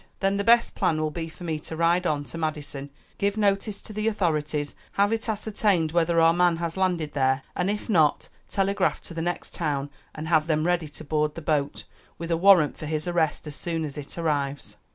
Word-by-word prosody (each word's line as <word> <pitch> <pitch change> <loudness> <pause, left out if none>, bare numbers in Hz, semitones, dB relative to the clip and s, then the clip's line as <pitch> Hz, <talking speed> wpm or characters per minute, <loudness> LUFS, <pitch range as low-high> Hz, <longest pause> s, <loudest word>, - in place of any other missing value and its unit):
"Then 195 0 +1
the 200 - 0
best 235 +2 +4
plan 155 - +1
will 155 0 -1
be 165 0 -5
for 170 - -13
me 160 -3 -2
to 160 - -7
ride 170 +2 +2
on 150 -3 0
to 145 +4 -8
Madison, 145 -3 -4 0.3
give 200 +1 0
notice 200 0 +1
to 215 - -10
the 215 +1 -1
authorities, 155 -8 0 0.2
have 205 +2 +2
it 225 0 -2
ascertained 205 -6 +1
whether 170 0 +2
our 165 0 +6
man 175 -1 +3
has 170 -1 -3
landed 180 -5 0
there, 130 -1 +1
and 180 +2 0
if 210 0 -3
not 160 -8 +3 0.2
telegraph 195 0 +1
to - - -8
the 165 - -3
next 175 +1 -3
town 145 -3 -2 0.2
and 155 +1 -5
have 155 -1 +3
them 155 -1 +1
ready 175 -2 +1
to 150 - -10
board 150 0 0
the 165 - -6
boat, 150 -2 -1 0.3
with 170 0 -5
a - - +4
warrant 180 -4 +5
for 155 - -5
his 155 +1 -2
arrest, 165 -4 0
as 150 -2 -6
soon 165 -1 -2
as 145 - -7
it 145 +2 -8
arrives." 145 -4 -2
165 Hz, 215 wpm, -26 LUFS, 150-190 Hz, 0.3 s, our